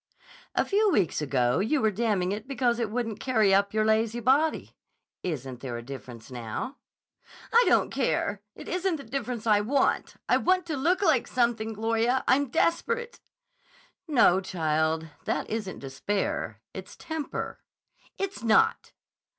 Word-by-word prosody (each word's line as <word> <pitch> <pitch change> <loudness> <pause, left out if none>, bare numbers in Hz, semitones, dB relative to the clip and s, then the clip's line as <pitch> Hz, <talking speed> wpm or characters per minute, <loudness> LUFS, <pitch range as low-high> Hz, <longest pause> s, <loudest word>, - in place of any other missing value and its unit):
"A - - +2
few 420 +1 +3
weeks 195 - +1
ago 130 -3 +1
you 230 +10 +1
were 220 -4 +2
damning 205 -4 0
it 210 +3 -5
because 245 -3 0
it 230 -3 -1
wouldn't 225 -1 -3
carry 220 -6 +3
up 200 +1 +3
your 215 0 +1
lazy 220 +2 +2
body. 275 +7 +1 0.5
Isn't 135 -7 -4
there 125 -3 -5
a 120 - -7
difference 120 -2 -10
now?" 125 - -5 0.8
"I 475 +2 +7
don't - - +3
care; 240 -6 0
it - - -10
isn't 365 0 0
the 285 - -7
difference 240 -2 -4
I 210 -2 +4
want. 265 +6 +1
I - - +4
want 370 -1 +2
to 320 -3 -3
look 350 +8 +1
like 305 -9 +3
something. 235 -3 0
Gloria, 230 +4 +1
I'm 280 0 +3
desperate." 470 - 0 0.9
"No, 230 - +5
child. 160 -3 0 0.2
That - - -1
isn't 215 -4 -3
despair. 135 +10 -3
It's - - -9
temper." 315 -2 -5 0.6
"It's 390 0 -4
not." 225 -2 +2
225 Hz, 150 wpm, -27 LUFS, 185-275 Hz, 0.9 s, I